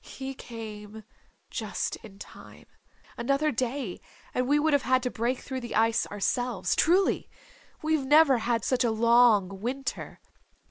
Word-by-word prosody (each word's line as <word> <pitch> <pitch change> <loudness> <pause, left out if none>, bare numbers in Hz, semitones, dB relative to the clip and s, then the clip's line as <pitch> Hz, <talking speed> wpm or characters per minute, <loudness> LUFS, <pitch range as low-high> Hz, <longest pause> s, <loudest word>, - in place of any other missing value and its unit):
"He 270 0 -7
came 220 -3 -9 0.5
just - - -3
in 205 -3 -14
time. - - -13 0.5
Another 275 +5 +1
day 250 -5 -3 0.3
and 250 0 0
we 290 +2 +3
would 305 +1 +2
have 285 - +4
had 255 -1 +1
to 250 - -2
break 240 +3 -1
through 265 -1 -5
the 240 - -6
ice 225 +1 +2
ourselves. 205 -1 -1
Truly. 365 +4 +2 0.5
We've 310 -2 +1
never 295 -3 +6
had 230 -1 -1
such 255 -1 +1
a 235 - +2
long 220 -4 +4
winter. 265 +4 -4
245 Hz, 145 wpm, -27 LUFS, 225-270 Hz, 0.5 s, never